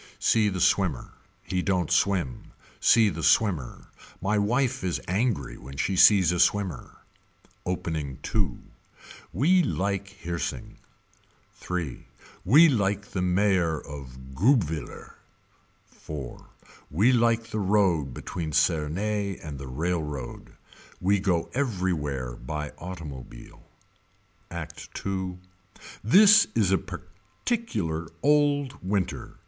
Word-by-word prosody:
See 110 -2 +3
the 95 -2 -3
swimmer. 85 -6 +1 0.3
He 90 -1 -2
don't 90 -4 0
swim. 90 -10 0 0.3
See 110 -2 +5
the 80 -3 -5
swimmer. 85 - +1 0.3
My 100 +4 0
wife 125 +4 0
is 90 -2 -1
angry 95 - -1
when 70 +2 -10
she 95 +5 0
sees 95 -2 +6
a 90 - -1
swimmer. 95 -8 0 0.7
Opening 80 -7 -3 0.2
II. 100 - 0 0.7
We 160 - +3
like 100 - -1 0.2
Hirsing. 85 -3 -4 0.9
III. 85 -7 -3 0.4
We 150 - +7
like 100 -6 0
the 95 - -2
mayor 90 -3 +2
of 65 -2 -10
Guebwiller. 90 - 0 0.9
IV. 70 -5 -7 0.4
We 100 - +3
like 115 -2 +3
the 110 - -2
road 95 -8 +2
between 80 -3 -5
Cernay 90 +6 0
and 75 -3 -6
the 70 - -7
railroad. 75 -2 -4 0.5
We 100 +2 +2
go 90 -4 0
everywhere 85 - -2
by 75 +4 -5
automobile. 75 -9 -9 0.9
Act - - -7 0.2
II. 95 -2 -3 0.7
This 205 - +7
is 105 -5 +2
a 95 - +3
particular 95 - -4 0.2
old 145 -3 +2
winter. 95 -1 -2
90 Hz, 110 wpm, -26 LUFS, 80-105 Hz, 0.9 s, We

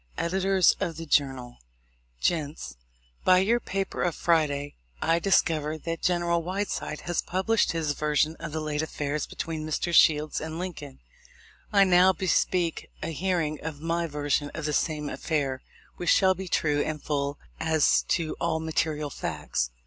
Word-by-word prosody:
Editors 190 +1 +3
of 165 -2 -2
the 165 - -6
Journal: 135 -5 0 0.6
Gents: 155 - -2 0.2
— - - -36
By 185 - +6
your 220 +6 +3
paper 195 -3 -3
of 175 -3 0
Friday, 145 -4 +1 0.3
I 165 +1 +2
discover 160 -5 +2
that 165 +1 -5
General 175 -1 +1
Whiteside 185 -3 -3
has 175 -1 -1
published 190 +4 +1
his 160 -3 0
version 150 +1 +1
of 165 -2 -6
the 155 +1 -3
late 150 -1 -1
affair 150 -1 -3
between 160 -2 -4
Messrs. 155 +2 -1
Shields 150 -1 +4
and 160 +1 -5
Lincoln, 165 - -7 0.7
I 200 -1 +6
now 185 0 +5
bespeak 180 -2 0
a 160 - -2
hearing 165 -3 -1
of 155 -2 -5
my 165 +2 -1
version 145 -1 -1
of 155 - -4
the 150 - -1
same 150 0 0
affair, 140 -4 -2 0.4
which 175 - -2
shall 190 -1 +5
be 190 +1 -7
true 150 -4 +1
and 155 0 -2
full 145 -1 -2 0.2
as 160 -1 +3
to 165 -3 0
all 165 -1 0
mate 160 0 0
rial 150 -2 -4
facts. - - -2
160 Hz, 160 wpm, -27 LUFS, 150-175 Hz, 0.7 s, By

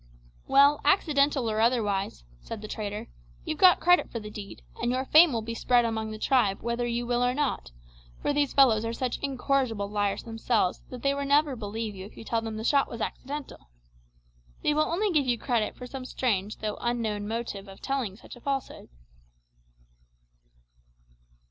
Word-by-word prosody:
'" - - -30
"Well, 285 +2 +5
accidental 290 -8 +2
or 215 0 0
otherwise," 205 - 0 0.2
said 215 - -8
the - - -5
trader, 210 -1 -5 0.4
"you've 310 - -3
got 370 -2 +7
credit 355 +1 +4
for 230 - -4
the 210 -1 -8
deed, 205 -1 -9 0.2
and 240 - 0
your 260 +1 -1
fame 315 +3 +7
will 230 -3 -2
be 230 +1 -4
spread 240 +1 +3
among 220 -1 -2
the 215 - -6
tribe 215 -5 +1
whether 235 +1 -1
you 240 0 -2
will 245 0 +1
or 250 +1 +1
not; 285 - -1 0.5
for - - 0
these 290 -1 +1
fellows 235 -6 +5
are 230 0 -2
such 250 +1 -2
incorrigible 260 -6 0
liars 205 -1 -1
themselves 225 -4 0
that 250 -2 -9
they 275 0 +2
will 280 0 -2
never 285 0 +3
believe 220 -1 -4
you 190 0 -8
if - - -18
you - - -8
tell 230 0 -1
them 220 -1 -5
the 220 - -5
shot 280 +3 +3
was 235 - -7
accidental. 270 - -6 0.9
They 300 - +3
will 305 +1 +2
only 400 +4 +1
give 295 -5 +2
you 240 -1 +2
credit 235 -3 -1
for 250 - -8
some 255 +1 -7
strange 215 -6 -1
though 215 -1 -4
unknown 220 -4 -1
motive 220 -3 -4
in 195 0 -11
telling 265 -8 -2
such 230 - -12
a 245 - -15
falsehood." 275 0 -4
235 Hz, 185 wpm, -27 LUFS, 215-275 Hz, 0.9 s, got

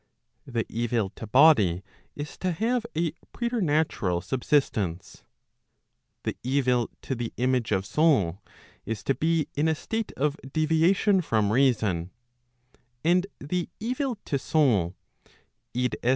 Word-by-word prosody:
The 115 -3 -1
evil 115 -3 -1
to 110 - -9
body 105 - +5 0.3
is 145 0 -6
to 185 -1 0
have 235 +5 0
a 165 0 +1 0.2
preternatural 160 - 0
subsistence; 105 - -1 1.0
the - - -2
evil 125 -2 +1
to - - -2
the 120 -2 -3
image 125 -2 +1
of 95 -1 +1
soul 105 - +2 0.4
is 110 0 -4
to 135 - +2
be 160 +1 +1
in 150 +3 +1
a 160 - +2
state 225 +7 -3
of 150 +2 0
deviation 165 +6 +3
from 110 - +1
reason; 110 -10 +2 0.9
and 180 +3 +3
the 175 +4 -3
evil 250 +2 -2
to 140 - -1
soul 110 - +2 0.8
[i. 125 0 +2
140 Hz, 125 wpm, -26 LUFS, 110-165 Hz, 1.0 s, body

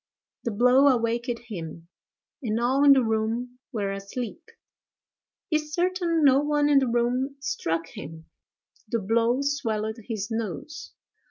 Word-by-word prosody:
The - - +1
blow 250 +6 +5
awaked 235 -1 +1
him, 170 -6 -7 0.5
and 225 -3 -1
all 260 +4 +2
in 285 -1 +9
the 265 -2 +3
room 230 +3 -1
were 205 -5 -2
asleep; 200 +8 -5 1.1
is 305 -1 -1
certain 350 -2 +1
no 270 -1 +6
one 295 0 +2
in 285 -1 +6
the 265 - 0
room 245 +3 0
struck 165 -11 -2
him: 160 +2 -9 0.6
the 235 - 0
blow 230 +5 +1
swelled 220 -6 -1
his 215 -3 -4
nose. 225 - -5
240 Hz, 135 wpm, -26 LUFS, 220-275 Hz, 1.1 s, in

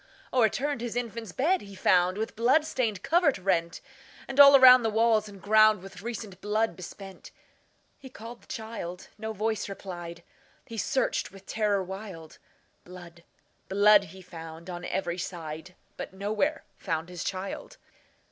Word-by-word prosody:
O'erturned 255 +3 +1
his 240 -1 -4
infant's 230 -3 -4
bed 335 - +1
he 200 -1 -11
found, 185 0 +3
With 220 +1 -4
blood 255 +8 +3
stained 220 -10 -2
covert 330 - +3
rent; 175 -3 -1 0.5
And 270 +1 -4
all 280 0 +10
around 255 -1 +9
the 225 - 0
walls 220 -1 +2
and 200 -1 -12
groundWith 210 -2 +3
recent 220 -4 -7
blood 210 -2 0
besprent. 190 +2 -10 0.7
He 265 - -11
called 235 0 -10
his - - -24
child,—no 220 0 -7
voice 220 0 -2
replied,—He 175 +3 -10
searched 260 - -1
with 195 0 -15
terror 205 -3 0
wild; 190 -4 -9 0.4
Blood, 175 -1 -13 0.5
blood, 205 +1 +5
he 190 +2 -13
found 165 0 -9
on 175 0 -6
every 175 -2 -2
side, 170 0 -7 0.2
But - - -7
nowhere 215 +11 -1 0.2
found 165 -2 -3
his 180 -1 -6
child. 190 +1 -5
205 Hz, 140 wpm, -28 LUFS, 180-230 Hz, 0.7 s, all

